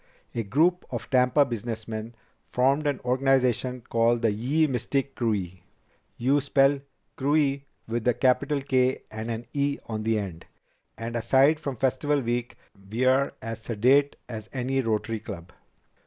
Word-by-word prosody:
A 115 - -1
group 155 - +2
of - - -5
Tampa 130 +2 +4
businessmen 115 -1 -5 0.4
formed 135 +4 +2
an 140 -3 0
organization 130 -1 +1
called 115 0 +1
Ye 125 +9 +2
Mystic 135 +1 -1
Krewe. 100 -6 -1 0.6
You 135 +4 +2
spell 140 0 +3 0.4
Krewe 140 0 +2 0.3
with 115 +1 -2
a 125 - +4
capital 135 +2 +2
K 130 -1 +1
and 110 +1 -5
an 115 +1 -4
e 140 0 0
on 110 -1 -4
the 110 0 +1
end. 95 -6 -6 0.5
And 115 +1 -5
aside 135 +6 +4
from 140 -4 -4
Festival 140 +4 +1
Week, 120 -1 -2 0.3
we're 130 +4 +2
as 115 0 -5
sedate 125 +6 +3
as 110 -3 -7
any 135 +1 0
Rotary 115 -1 -1
Club." 85 -3 -9
125 Hz, 140 wpm, -26 LUFS, 115-135 Hz, 0.6 s, Tampa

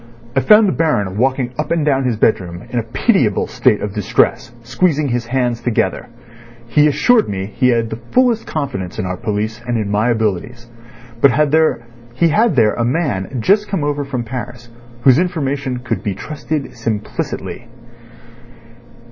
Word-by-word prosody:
I - - +4
found 210 +8 +6
the - - +2
Baron 105 - 0
walking 130 +2 0
up 155 - -2
and 165 -3 0
down 135 -3 +1
his 125 -3 +1
bedroom 90 -5 0
in 120 - 0
a - - -2
pitiable 115 - +1
state 105 - +1
of 105 -1 -4
distress, 105 +2 0
squeezing 145 +4 0
his 120 -1 -2
hands 120 -2 -1
together. 120 -2 -1 0.6
He 150 +6 +4
assured 225 - +3
me 95 -1 -3
he 120 +5 0
had 115 -2 +1
the 110 - -5
fullest 245 -3 +2
confidence 95 - -4
in - - -2
our 90 0 -3
police 110 +4 -3
and 120 -1 0
in 105 -2 -2
my 105 +3 +1
abilities, 110 +1 -2 0.6
but 140 - +7 0.9
he 165 +6 +3
had 215 +2 +2
there 110 -4 +4
a 120 - -1
man 125 - -1
just 210 - +3
come 190 -7 -2
over 145 0 -1
from 135 -3 -4
Paris 120 0 -7 0.3
whose 130 +1 +6
information 140 -7 -2
could 120 - -2
be 100 -3 -3
trusted 150 +4 -4 0.2
implicity. 110 +1 -4
125 Hz, 165 wpm, -17 LUFS, 110-150 Hz, 0.9 s, but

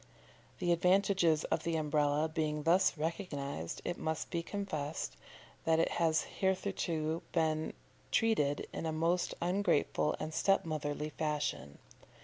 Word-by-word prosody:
The 175 - +1
advantages 180 -2 +3
of - - 0
the 165 -1 -1
Umbrella 150 0 +2
being 155 -2 -1
thus 170 +1 +4
recognised, 145 - -3
it 175 - -2
must 160 0 -2
be 170 - 0
confessed 165 -6 -4 0.5
that 160 0 +3
it 165 - +3
has 160 -1 +3
hitherto 175 -4 -1
been 160 -2 +1 0.4
treated 150 -11 +2
in 165 - -3
a - - 0
most 165 +3 +1
ungrateful 180 -4 +1
and 155 - -4
step 195 +3 +3
motherly 150 -1 -2
fashion. 145 - -2
160 Hz, 125 wpm, -33 LUFS, 150-175 Hz, 0.5 s, thus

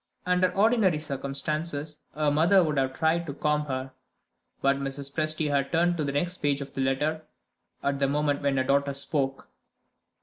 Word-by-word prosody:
Under 180 0 +2
ordinary 205 -4 +3
circumstances, 150 +1 -3 0.2
her 150 -1 +1
mother 175 +6 +5
would 150 -3 0
have 130 0 -1
tried 165 +1 +1
to 140 - -5
calm 150 0 0
her. 130 -1 -4 0.7
But 140 0 +2
Mrs. 140 0 -4
Presty 155 -1 0
had 140 -1 0
turned 175 +1 +2
to 155 - -1
the 140 - -1
next 175 +6 -1
page 145 -1 0
of 140 - -7
the 135 - -2
letter, 150 +4 0 0.6
at 140 0 0
the 140 - +2
moment 145 0 0
when 140 -1 +1
her 130 - +2
daughter 140 +1 +1
spoke. 135 -1 -2
145 Hz, 175 wpm, -27 LUFS, 140-160 Hz, 0.7 s, mother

